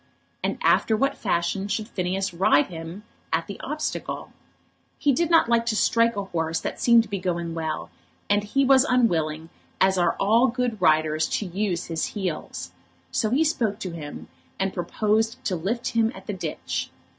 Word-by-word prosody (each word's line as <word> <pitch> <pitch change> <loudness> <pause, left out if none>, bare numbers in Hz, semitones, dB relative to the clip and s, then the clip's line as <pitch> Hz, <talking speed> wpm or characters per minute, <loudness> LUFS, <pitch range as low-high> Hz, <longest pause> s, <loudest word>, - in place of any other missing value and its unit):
And - - -1
after 220 - +3
what 275 +5 +1
fashion 190 0 -1
should 210 +1 -2
Phineas 190 -2 -2
ride 170 -4 +4
him 165 +3 -8 0.3
at - - +1
the - - -8
obstacle? - - -4 0.6
He 290 - +2
did 330 +6 +1
not 330 -7 +5
like 235 0 +3
to 225 - +1
strike 230 +1 +3
a 200 - -2
horse 165 -3 -2
that - - -4
seemed 235 -1 +6
to - - -12
be 200 -2 -2
going 170 -2 -2
well, 160 -1 -4 0.4
and 205 0 +2 0.2
was 265 -1 +6
unwilling, 165 - +1 0.3
as 190 -1 +3
are 175 - +3
all 225 +6 +4
good 245 -4 -2
riders, 155 -2 +3
to 210 - -3
use 185 -1 -2
his 165 -1 -3
heels. 170 - -4 0.4
So 215 - +1
he 270 +8 +3
spoke 235 -10 0
to 185 - -4
him, 150 -3 -8 0.3
and 195 0 0
proposed 220 +7 0
to 185 - 0
lift 210 +9 -2
him 225 -1 +2
at - - -11
the 210 - -3
ditch. 170 -5 -4
195 Hz, 175 wpm, -25 LUFS, 170-230 Hz, 0.6 s, seemed